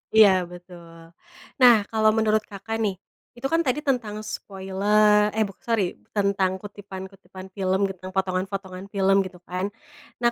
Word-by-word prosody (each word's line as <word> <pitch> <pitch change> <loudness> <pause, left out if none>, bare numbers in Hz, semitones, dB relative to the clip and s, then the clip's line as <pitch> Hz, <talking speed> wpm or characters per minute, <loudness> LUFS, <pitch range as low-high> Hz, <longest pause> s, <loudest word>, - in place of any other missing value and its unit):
Iya, 215 -2 +9 0.2
betul. 175 -1 -12 0.7
Nah, 245 -1 +9 0.2
kalau 220 -1 +4
menurut 215 -1 +3
Kakak, 205 +2 -5
nih. 200 -2 -1 0.4
Itu 255 +3 -2
kan 330 - +4
tadi 255 +3 +1
tentang 240 -6 0 0.2
spoile 190 -1 -7 0.5
eh 220 - +3
buk 195 - -13
sori, 230 -2 +1 0.3
tentang 200 -2 +2
kutipan-kutipan 190 -2 -10
film 190 -1 +1
gitu, 195 - -3
tentang 185 0 -8
potongan-potongan 190 0 -2
film, 195 -1 +3
gitu 185 -1 -9
kan. 180 +1 -2 0.6
Nah, 240 0 +3
195 Hz, 145 wpm, -24 LUFS, 190-215 Hz, 0.7 s, Iya